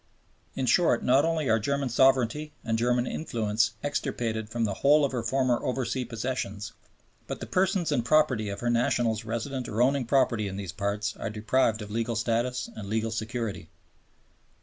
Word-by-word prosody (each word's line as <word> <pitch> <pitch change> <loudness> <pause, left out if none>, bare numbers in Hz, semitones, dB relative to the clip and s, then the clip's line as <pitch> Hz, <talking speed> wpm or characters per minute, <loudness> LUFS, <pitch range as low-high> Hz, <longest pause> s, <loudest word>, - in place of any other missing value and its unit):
In 130 - -1
short, 125 +1 +3
not 130 +4 +4
only 165 -3 0
are 110 0 +3
German 140 +4 -1
sovereignty 135 +4 +2
and 115 - 0
German 120 +1 +1
influence 115 -5 -1
extirpated 115 -6 -2
from 115 0 -2
the 100 - -1
whole 145 +7 +4
of 140 - -2
her 125 -3 -2
former 130 -1 +1
oversea 125 0 -1
possessions, 115 -3 -4 0.5
but - - -5
the - - -5
persons 185 -2 +1
and 120 - +1
property 130 -7 +2
of 100 0 -5
her 120 - 0
nationals 115 -1 +1
resident 120 +3 -3
or 110 0 -3
owning 130 +1 +3
property 120 -4 +2
in 95 0 -5
those 100 -4 -5
parts 100 +3 -2
are - - -4
deprived 110 +1 +1
of 105 - -9
legal 115 +1 -1
status 120 +3 -1
and 100 -2 -7
legal 110 +1 -1
security. 110 -6 -4
120 Hz, 170 wpm, -27 LUFS, 110-130 Hz, 0.5 s, not